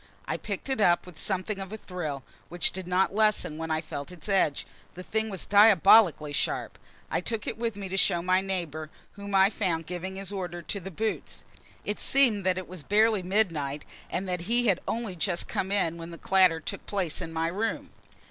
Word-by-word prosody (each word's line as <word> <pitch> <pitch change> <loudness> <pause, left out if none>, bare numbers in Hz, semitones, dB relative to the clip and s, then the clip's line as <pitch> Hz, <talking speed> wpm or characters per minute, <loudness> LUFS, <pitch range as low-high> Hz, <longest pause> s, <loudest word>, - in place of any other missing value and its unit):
I - - -2
picked 200 +2 -5
it 265 -5 -1
up 175 -3 +4
with 175 -3 -11
something 195 +1 0
of 195 0 -7
a 220 - -5
thrill, 155 -9 -5 0.3
which 175 0 +1
did 190 -1 -7
not 185 +2 +2
lessen 210 -7 +1
when 160 0 -4
I 155 0 0
felt 145 -1 -6
its 175 -1 -9
edge. 190 -8 +1 0.3
The 185 - -7
thing 220 +3 -1
was 190 -4 -3
diabolically 200 -6 +6
sharp. - - -2 0.3
I - - +1
took 220 +3 -3
it - - -3
with 230 -1 -2
me 200 -1 -6
to 190 +1 -3
show 170 -2 +3
my 185 +1 +3
neighbor, 170 -5 -4 0.2
whom 200 0 -5
I 195 +1 +5
found 170 -7 -1
giving 180 +3 -5
his 195 0 -5
order 175 -3 -5
to 200 - -3
the 190 +1 -7
boots; 215 +5 -3 0.4
it 210 - -2
seemed 245 -7 +3
that 185 0 +2
it 185 - -5
was 185 -2 -8
barely 215 +4 +3
midnight, 165 -7 -1 0.2
and 190 +2 -3
that 180 +1 -3
he 240 +1 +4
had 195 -5 +3
only 225 -5 -3
just 175 +1 -1
come 190 - -2
in 170 -5 +1
when 165 0 -7
the 170 - -9
clatter 185 -3 +4
took 155 - -7
place 190 -6 -2
in 165 - -5
my 165 0 -1
room. 210 +6 -3
185 Hz, 210 wpm, -28 LUFS, 170-205 Hz, 0.4 s, diabolically